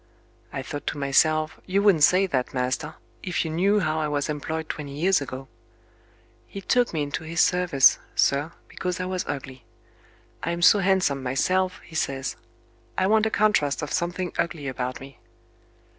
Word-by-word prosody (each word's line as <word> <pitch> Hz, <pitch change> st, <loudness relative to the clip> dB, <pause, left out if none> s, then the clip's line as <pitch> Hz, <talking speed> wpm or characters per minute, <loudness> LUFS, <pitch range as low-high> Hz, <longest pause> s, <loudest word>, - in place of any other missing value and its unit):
I 135 Hz, -, -4 dB
thought 145 Hz, +2 st, -7 dB
to -, -, -2 dB
myself, 155 Hz, +3 st, +2 dB
you 195 Hz, +2 st, +1 dB
wouldn't 185 Hz, -8 st, +4 dB
say 185 Hz, +5 st, +5 dB
that, 130 Hz, -8 st, -2 dB
master, 130 Hz, +5 st, -2 dB, 0.3 s
if 180 Hz, -2 st, -2 dB
you 160 Hz, -, -3 dB
knew 200 Hz, +6 st, +2 dB
how 155 Hz, -2 st, 0 dB
I 155 Hz, -, 0 dB
was 145 Hz, 0 st, -2 dB
employed 160 Hz, +2 st, -3 dB
twenty 145 Hz, -3 st, -6 dB
years 185 Hz, 0 st, +3 dB
ago. 135 Hz, -1 st, -7 dB, 1.0 s
He 200 Hz, -, -8 dB
took 245 Hz, +5 st, +1 dB
me 155 Hz, -3 st, -1 dB
into 145 Hz, +3 st, -4 dB
his 160 Hz, +1 st, -4 dB
service, 175 Hz, -8 st, +4 dB, 0.2 s
sir, 145 Hz, +4 st, +2 dB, 0.2 s
because 180 Hz, -1 st, -4 dB
I 185 Hz, -, -2 dB
was 185 Hz, -1 st, -2 dB
ugly. 135 Hz, -3 st, -6 dB, 0.8 s
'I'm 170 Hz, +1 st, -2 dB
so 205 Hz, +3 st, +7 dB
handsome 185 Hz, -8 st, +1 dB
myself;' 185 Hz, +9 st, 0 dB
he -, -, -16 dB
says, 135 Hz, -4 st, -2 dB, 0.6 s
'I -, -, +2 dB
want 215 Hz, +2 st, +3 dB
a -, -, 0 dB
contrast 200 Hz, -11 st, +1 dB
of 150 Hz, -, -4 dB
something 175 Hz, 0 st, -2 dB
ugly 160 Hz, -4 st, -2 dB
about 130 Hz, -1 st, -4 dB
me.' 135 Hz, +1 st, -13 dB
160 Hz, 170 wpm, -25 LUFS, 140-185 Hz, 1.0 s, so